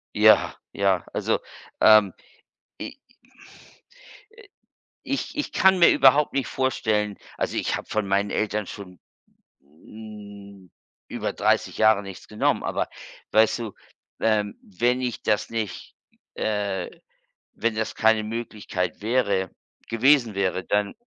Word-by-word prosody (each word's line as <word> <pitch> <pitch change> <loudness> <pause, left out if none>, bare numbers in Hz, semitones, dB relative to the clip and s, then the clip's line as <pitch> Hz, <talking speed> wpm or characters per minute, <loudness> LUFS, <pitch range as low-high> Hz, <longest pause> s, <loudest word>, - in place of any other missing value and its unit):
Ja, - - +5 0.2
ja, 95 -3 +1
also, - - 0 0.4
ähm, 105 -4 +6 0.7
i - - -7 1.4
äh, 460 - -15 0.6
ich 275 - -3
ich 295 - -2
kann 190 -2 +4
mir 170 - +7
überhaupt 140 +2 +5
nicht 135 -1 -1
vorstellen 110 -6 -1 0.2
also, - - -2
ich - - 0
habe - - -7
von 110 -2 -1
meinen 100 +1 +1
Eltern 105 -1 -1
schon 90 -4 -10 0.6
hm 100 +4 -13 0.4
über - - -4
30 - - +1
Jahre 110 -2 +4
nichts 95 -2 -10
genommen. 105 - 0
Aber - - -2 0.4
weißt 110 +2 +4
du, 110 -4 -5 0.5
ähm, 105 -2 +1
wenn 120 +6 0
ich 125 -2 -3
das 105 -1 0
nicht, 110 -5 -5 0.4
äh 100 -4 -2 0.7
wenn 115 -1 -1
das 110 0 -2
keine 110 -1 +3
Möglichkeit 105 -6 -4
wäre 100 -5 +1 0.4
gewesen 120 -1 +3
wäre, 95 -1 -1
dann 105 +3 0
105 Hz, 120 wpm, -24 LUFS, 100-115 Hz, 1.4 s, mir